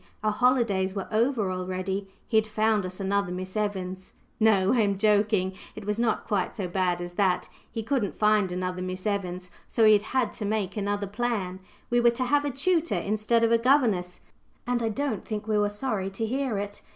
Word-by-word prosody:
Our 215 - +2
holidays 210 -5 +2
were 195 - -3
over 225 -3 +1
already. 185 +2 -3 0.2
He 225 - -3
had 220 0 +3
found 215 -2 +1
us 185 +1 -9
another 200 -1 0
Miss 185 +2 -5
Evans! 190 -3 -3 0.2
No; 210 -3 +4
I 250 - +2
am 200 -3 +2
joking. 205 -2 +2 0.2
It - - -8
was 210 +2 -1
not 235 -2 +1
quite 200 -5 -1
so 195 -4 -3
bad 180 -1 0
as 175 0 -7
that. 185 -1 +1 0.2
He 225 - -4
couldn't 235 -4 -1
find 210 -3 +3
another 180 0 -3
Miss 185 +1 -5
Evans, 180 -3 -2 0.2
so 225 - +3
he 215 - +8
had 205 - +4 0.2
had 245 -4 +2
to - - -7
make 205 -2 -1
another 205 -1 -1
plan. 205 -3 -2 0.3
We 240 - +4
were 240 0 +6
to 240 +2 -1
have 290 +3 +2
a - - +1
tutor 330 +5 +1
instead 215 +3 +1
of 230 - +3
a 230 - +5
governess; 230 -9 +2 0.4
and 245 0 0
I 225 - 0
don't 240 -2 -2
think 215 -1 -5
we 215 -1 +2
were 205 0 +2
sorry 205 -3 -2
to 195 +4 -3
hear 255 -1 -1
it. 205 0 -5
210 Hz, 205 wpm, -27 LUFS, 190-230 Hz, 0.4 s, he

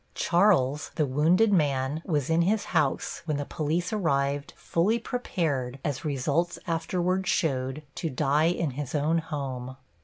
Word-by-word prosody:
Charles, 170 -7 +2
the 155 - +2
wounded 165 +11 +3
man, 145 -3 +1
was 150 -7 0
in 165 +1 +4
his 205 +5 +1
house 150 -5 0
when 155 -3 -1
the 145 - -3
police 165 +6 -2
arrived, 140 -7 0
fully 195 +8 +1
prepared, 160 - -2
as 140 -4 -2
results 150 +4 0
afterward 180 +2 -1
showed, 135 -4 0
to 165 - -3
die 145 +3 +2
in 170 -3 +1
his 140 +2 -5
own 155 +3 +2
home. 130 -5 -5
155 Hz, 145 wpm, -27 LUFS, 140-175 Hz, -, in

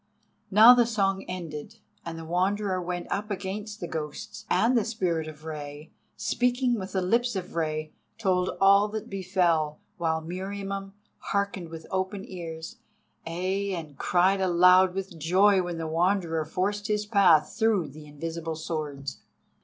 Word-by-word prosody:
Now 220 +5 +9
the 240 -2 +4
song 195 -4 +1
ended, 165 -5 -6 0.3
and 165 -1 -6
the 165 - -7
Wanderer 185 +2 0
went 175 0 -4
up 210 +2 -2
against 205 +2 -5
the 175 - -4
ghosts, 160 +6 -6
and 240 +3 +3
the 230 - +3
Spirit 175 -8 -1
of 155 0 -11
Rei, 150 -1 -7 0.3
speaking 245 -1 +1
with 190 0 -7
the 190 -1 0
lips 235 +5 +1
of 185 -2 -5
Rei, 155 -1 -2 0.2
told 185 -4 +1
all 200 +1 +6
that 215 0 -6
befell, 175 -5 +1 0.2
while 160 -2 0
Meriamun 195 +3 -5 0.3
hearkened 200 -4 -2
with 165 0 -9
open 190 +1 -2
ears—ay, 180 +2 -5
and 155 -4 -7
cried 185 +2 +3
aloud 180 +1 +5
with 195 -3 -5
joy 190 +5 +4
when 175 -1 -4
the 165 - -3
Wanderer 165 -1 +1
forced 205 +6 -2
his 210 -1 0
path 195 -7 +4
through 220 -7 +2
the 150 +2 -12
invisible 160 +2 -5
swords. 150 -4 -5
185 Hz, 145 wpm, -27 LUFS, 165-200 Hz, 0.3 s, Now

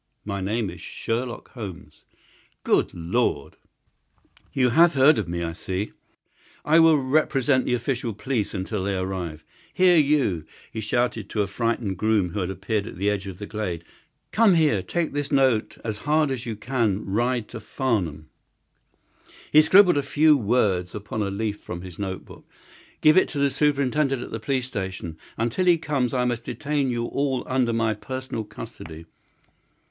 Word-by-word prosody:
"My 100 -1 -3
name 105 0 -1
is 90 - -11
Sherlock 120 +1 -4
Holmes." 90 - -9 0.6
"Good - - +2
Lord!" 85 - -1 1.0
"You 125 -2 +2
have 165 +6 +5
heard 140 +2 +6
of 100 - -3
me, 85 0 -3
I 85 -1 -3
see. 95 +4 -4 0.7
I 160 +2 +5
will 165 -2 +6
represent 135 -1 +2
the 125 - +1
official 120 -2 -2
police 110 -2 -2
until 95 +1 -3
their 100 -2 -1
arrival. 90 -5 -4 0.3
Here, 180 -1 +5
you!" 140 - +2 0.3
he 110 - -4
shouted 110 -1 -1
to 105 - 0
a - - -1
frightened 115 -1 -2
groom 105 -4 +2
who 105 - -3
had 90 -1 -2
appeared 100 +2 -2
at - - -9
the 100 +3 +1
edge 100 -1 -3
of 95 -2 -7
the 105 - -6
glade. 95 -6 -4 0.5
"Come 215 -4 +5
here. 150 - +3
Take 170 - -2
this 145 -1 -3
note 130 -6 +2
as 110 -2 -3
hard 150 +1 +2
as 125 -2 -4
you 115 - -3
can 110 -3 -1
ride 120 +3 0
to 115 - -7
Farnham." 100 - -2 1.2
He 155 - +8
scribbled 180 +1 +6
a - - +1
few 150 +2 +4
words 105 -7 +1
upon 105 +1 -4
a 100 - 0
leaf 105 +1 -3
from 85 -1 -7
his 90 -1 -10
note 95 -2 -4
book. - - -15 0.5
"Give 155 +2 +6
it 185 - +5
to 150 - -6
the 140 0 +2
superintendent 140 -2 +1
at - - -9
the 115 - -4
police 130 +3 -1
station. 95 -8 -5 0.2
Until 120 +10 0
he 175 -2 +5
comes 140 -6 -1
I 125 -2 +1
must 120 -1 -1
detain 145 -2 -1
you 120 -1 -1
all 135 0 -1
under 130 -2 +1
my 115 -1 +1
personal 130 +1 -5
custody." 80 -5 -10
115 Hz, 175 wpm, -24 LUFS, 100-135 Hz, 1.2 s, He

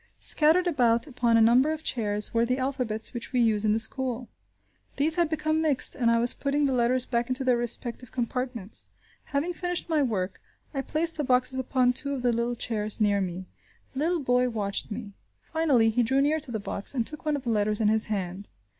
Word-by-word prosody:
Scattered 325 +4 +3
about 245 -8 +2
upon 240 -5 +1
a - - +5
number 245 +6 +5
of 315 0 -5
chairs, 210 -5 -1
were 230 0 +3
the 250 +2 0
alphabets 255 -5 -2
which 235 -1 -6
we 255 - +1
use 220 -3 +2
in 215 - +2
the - - +2
school. 245 +1 -2 0.7
These 300 +3 +2
had 340 -1 +1
become 315 0 0
mixed, 300 -5 +2
and 240 -4 +1
I 230 - +3
was 240 +1 +3
putting 285 +1 0
the 270 - +1
letters 250 +1 +2
back 235 0 -1
into 255 +1 0
their 255 -1 +3
respective 240 +1 -1
compartments. 245 -4 -4 0.4
Having 300 +5 -2
finished 355 0 -3
my 315 -2 +2
work, 195 -8 -2 0.3
I 275 - -1
placed 320 +4 -1
the 300 - -1
boxes 255 0 +1
upon 255 -1 +2
two 280 +2 -2
of 255 - -6
the 245 -1 +2
little 235 +1 -1
chairs 215 -2 -2
near 205 -2 +2
me. 185 0 -4 0.5
The 265 - -5
little 335 +2 0
boy 250 -1 +2
watched 205 -4 -2
me. 210 -2 -7 0.3
Finally, 275 -9 +2
he 245 +3 +1
drew 265 +4 +1
near 295 +3 +2
to 280 -4 -1
the 220 - -2
box, 200 +4 -4
and 235 -3 0
took 305 +4 -2
one 305 -1 0
of 280 - -5
the 240 - -1
letters 210 -1 +1
in 215 - +2
his 220 0 +3
hand. 195 -2 -4
250 Hz, 215 wpm, -27 LUFS, 225-280 Hz, 0.7 s, a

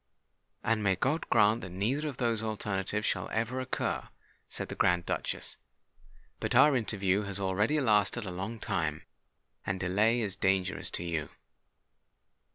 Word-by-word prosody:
"And 115 -1 +1
may 95 -2 +3
God 150 - -1
grant 110 +1 +4
that 95 - -6
neither 115 - -1
of 140 -4 -5
those 115 -3 0
alternatives 105 -1 -2
shall - - -1
ever 115 +4 -1
occur!" 130 0 -2 0.4
said - - -4
the - - -4
Grand 90 -1 +2
Duchess. - - -3 0.8
"But - - -1
our 150 -2 +7
interview 100 -4 +1
has 100 0 -4
already 100 +9 +1
lasted 105 -2 +2
a 90 - -4
long 95 +6 -4
time; 80 -5 -2 0.6
and 95 -1 -2
delay 105 +6 +2
is 100 -3 -1
dangerous 95 -1 0
to - - -1
you." 80 -3 -2
105 Hz, 150 wpm, -30 LUFS, 95-115 Hz, 0.8 s, our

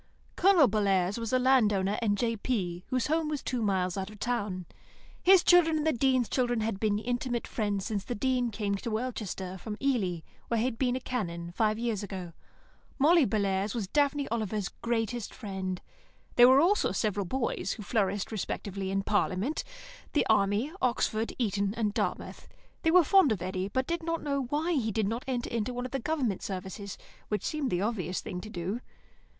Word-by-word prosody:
Colonel 360 -6 +6
Bellairs 200 -2 +1
was 230 -1 -3
a 255 - +4
land 255 -4 +4
owner 195 +1 0
and 205 -3 +1
J.P., 205 -6 -1
whose 255 -2 0
home 315 0 +1
was 295 -3 -3
two 250 -2 -2
miles 190 -3 0
out 190 +1 -4
of 215 - -11
the - - -4
town. 205 -7 -2 0.6
His 375 -1 +6
children 330 -3 +5
and 305 - -1
the 315 - +4
Dean's 255 -1 +2
children 245 -3 0
had 215 -3 -2
been 210 -1 +1
intimate 240 +1 -2
friends 205 -3 -2
since 210 -4 -2
the 240 - -4
Dean 250 +1 +1
came 205 -2 -2
to 230 - -5
Welchester 215 -5 -4
from 210 +1 -6
Ely, 205 -12 0 0.3
where 235 - 0
he 225 - +1
had 250 -2 -2
been 250 -2 +1
a - - -1
Canon, 170 -10 -4
five 215 +3 +1
years 230 -3 -1
ago. 185 -4 -6 0.6
Molly 310 +2 +5
Bellairs 200 -2 0
was 215 -5 -2
Daphne 285 +3 +1
Oliver's 215 -4 -2
greatest 230 -1 -3
friend. 190 -4 -4 0.6
There 245 +1 +8
were 265 +2 +7
also 400 +6 +3
several 205 -3 -1
boys, 235 -5 -1
who 215 - -8
flourished 200 -2 0
respectively 195 -2 -3
in 195 0 0
Parliament, 205 +6 0 0.5
the 295 - +3
Army, 205 +6 +2
Oxford, 230 -2 +1
Eton, 200 -3 0
and 210 -3 0
Dartmouth. - - -3 0.3
They 320 - +2
were 360 +1 +7
fond 380 - +5
of 190 -5 -1
Eddy, 185 +1 -2
but 260 +6 -1
did 340 +3 -2
not 330 0 -2
know 280 -2 -1
why 300 +7 -1
he 230 -8 0
did 215 -1 0
not 230 +4 -2
enter 240 -2 -2
one 245 0 -4
of 255 - -6
the 270 - -1
Government 255 - -1
services, 190 +1 -6 0.3
which 210 - -2
seems 300 -4 -1
the 175 -3 0
obvious 190 -5 -1
thing 180 -5 -5
to 215 - -9
do. 190 +5 -3
225 Hz, 190 wpm, -29 LUFS, 195-255 Hz, 0.6 s, There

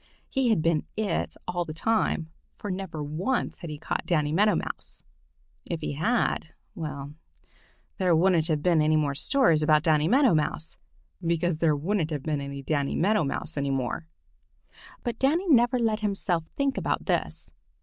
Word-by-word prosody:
He 265 -3 +1
had 210 -8 +2
been 165 -2 +1
"it" 210 -6 -1
all 175 -1 -1
the 155 -2 -7
time, 170 -5 0 0.3
for 205 - -5
never 185 -5 -4
once 175 - -2
had 170 - -7
he 150 - -5
caught - - -3
Danny 150 -4 +1
Meadow 210 +6 +4
Mouse. - - -5 0.6
If 170 -2 -4
he - - -2
had—well, 155 - -2 0.9
there 180 -3 +3
wouldn't 170 -1 +3
have 155 -3 0
been 170 -3 +4
any 155 +1 +3
more 150 -2 +1
stories 170 - +3
about 150 0 +4
Danny 155 -2 +3
Meadow 260 - +5
Mouse, 155 0 -1 0.5
because 170 -1 0
there 160 -3 +3
wouldn't 165 +2 0
have 150 -4 -3
been 150 -3 -1
any 140 0 -6
Danny 140 -1 0
Meadow 205 +2 +2
Mouse 150 +2 -3
any 140 0 0
more. 135 +4 -2 1.0
But 235 -1 -3
Danny 325 +8 +2
never 245 -4 +5
let 225 -3 +1
himself 195 -5 -1
think 280 -1 +1
about - - -1
this. - - -1
165 Hz, 165 wpm, -27 LUFS, 150-210 Hz, 1.0 s, Meadow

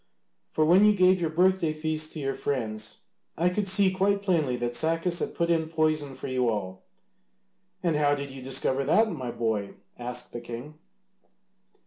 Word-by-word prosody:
For 155 - +1
when 180 +5 +6
you 210 0 +6
gave 185 -1 +4
your 165 - +1
birthday 180 -1 +2
feast 155 0 -3
to 155 - -6
your 135 -1 -1
friends 110 -6 -4 0.4
I 175 +2 +3
could 195 +2 -1
see 190 0 +4
quite 200 +1 +1
plainly 160 -10 +1
that 120 0 -2
Sacas 165 +4 0
had - - -3
put 170 0 +1
in 160 -1 +1
poison 155 -4 0
for - - -7
you 130 -2 +1
all." 95 -4 -3 1.0
"And 170 -3 +1
how 145 -1 +3
did 140 -1 -6
you 135 0 -9
discover 130 +1 0
that, 220 +9 +3
my 130 -7 -5
boy?" 110 -4 -2 0.2
asked 120 0 -6
the 120 - -5
king. 120 +6 -8
155 Hz, 175 wpm, -27 LUFS, 125-175 Hz, 1.0 s, when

